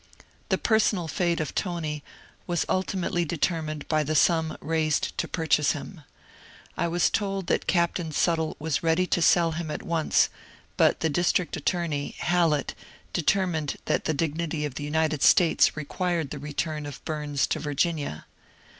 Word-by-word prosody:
The - - +2
personal 215 -6 +2
fate 170 +1 0
of 155 - -3
Tony 160 -5 -3 0.4
was 175 -2 0
ultimately 185 -1 0
determined 155 -2 -2
by 155 -1 +2
the 155 +1 -1
sum 160 0 +3
raised 155 -2 0
to - - 0
purchase 155 -3 +2
him. 155 +3 -8 0.7
I - - 0
was 175 +1 +2
told 195 -2 -1
that - - 0
Captain 170 -2 +1
Sut 165 +2 +2
tle 160 -1 -2
was 155 -1 -1
ready 165 +2 +2
to 180 - 0
sell 170 0 +4
him 165 0 -4
at - - -4
once, 165 -2 +2 0.5
but - - +3
the 160 - +2
district 175 +2 +1
attorney, 160 -2 -2
Hallett, 165 -5 +1 0.4
determined 175 -4 +1
that - - 0
the 160 - +1
dignity 160 0 -1
of 145 - -4
the 145 - -5
United 155 0 0
States 170 -3 +5
required 165 0 -2
the 145 - -5
return 150 +1 -3
of 145 - -10
Bums 150 -3 -1
to - - -2
Virginia. 145 - -2
160 Hz, 155 wpm, -26 LUFS, 150-175 Hz, 0.7 s, States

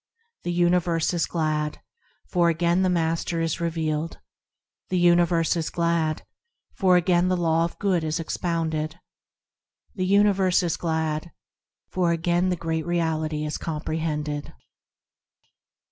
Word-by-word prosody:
The 175 - -3
universe 175 -1 +2
is 170 - 0
glad, 155 -2 -1 0.5
for 175 -2 +2
again 170 +2 +2
the 185 - +2
Master 165 -1 0
is 165 0 -1
revealed; 160 -1 -2 0.7
The 185 - 0
universe 175 -1 +3
is 165 -2 -2
glad, 170 -2 0 0.5
for 185 -2 +4
again 175 0 +2
the 185 0 +1
Law 165 -1 +2
of 170 - -7
Good 185 -5 +1
is 155 +1 -1
expounded; 160 -1 -2 0.9
The 185 -2 -2
universe 195 -2 +3
is 170 -3 0
glad, 160 0 -2 0.6
for 180 -2 +1
again 175 +2 +1
the 180 - +1
Great 160 -1 -3
Reality 160 -3 -1
is 150 - -3
comprehended. 150 -2 -3
170 Hz, 125 wpm, -25 LUFS, 160-175 Hz, 0.9 s, for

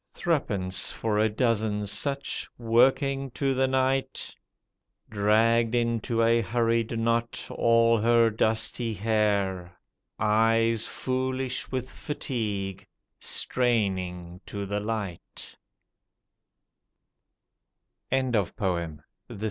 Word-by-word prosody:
Threepence 100 - 0
for 105 -2 -1
a 110 +1 +3
dozen 105 -2 0
such, 140 +7 -2
working 135 +4 +2
to 135 -1 0
the 130 0 +2
night. 130 0 -1 0.8
Dragged 115 +3 +3
into 115 0 0
a 115 +1 +4
hurried 115 +1 0
knot 115 +1 -1
all 115 0 +3
her 115 +1 +4
dusty 110 +1 0
hair 100 -4 0 0.3
— - - -53
Eyes 115 +1 +2
foolish 130 0 -3
with 130 -1 -2
fatigue 105 -10 -4 0.3
straining 95 -7 -1
to 100 -1 -5
the 100 +1 -2
light. 105 -5 -5
115 Hz, 85 wpm, -27 LUFS, 105-120 Hz, 0.8 s, a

